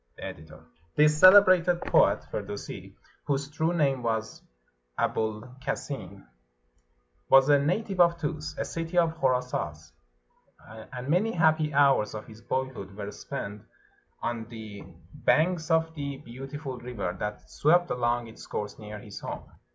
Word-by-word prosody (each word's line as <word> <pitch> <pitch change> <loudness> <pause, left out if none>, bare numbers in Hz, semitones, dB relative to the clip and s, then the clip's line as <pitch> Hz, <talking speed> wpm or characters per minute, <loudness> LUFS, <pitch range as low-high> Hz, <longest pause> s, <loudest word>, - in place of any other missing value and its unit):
The - - -10
Editor.] 80 +1 -10 0.3
This 150 0 +4
celebrated 185 -2 +7
poet - - +3
[Firdusi], - - -6 0.3
whose 140 0 -1
true 160 +2 0
name 140 -6 +1
was 110 -2 -2 0.6
Abul 110 -1 -1 0.2
Kasin, - - -5 1.0
was 135 +1 +7
a 145 -1 +6
native 185 +6 -1
of 170 -1 +5
Tus, 155 0 -4
a - - -2
city 165 +1 -4
of 165 -2 +3
Khorasas, 125 - -1 1.0
and 125 0 -6
many 185 +9 +2
happy 155 -2 +3
hours 140 -7 +3
of 105 - -6
his 110 0 -14
boyhood 125 -8 -4
were 105 0 -5
spent 105 -7 -6 0.6
on 115 -1 -2
the 110 -3 -9 0.3
banks 165 +1 +2
of 160 0 +2
the 140 -3 -4
beautiful 135 +1 -7
river 115 -8 -4
that 105 0 -5
swept 175 +4 +3
along 120 0 0
its 115 - -12
course 105 -1 -5
near 105 -1 -8
his 105 -2 -9
home. - - -6
135 Hz, 135 wpm, -28 LUFS, 110-160 Hz, 1.0 s, celebrated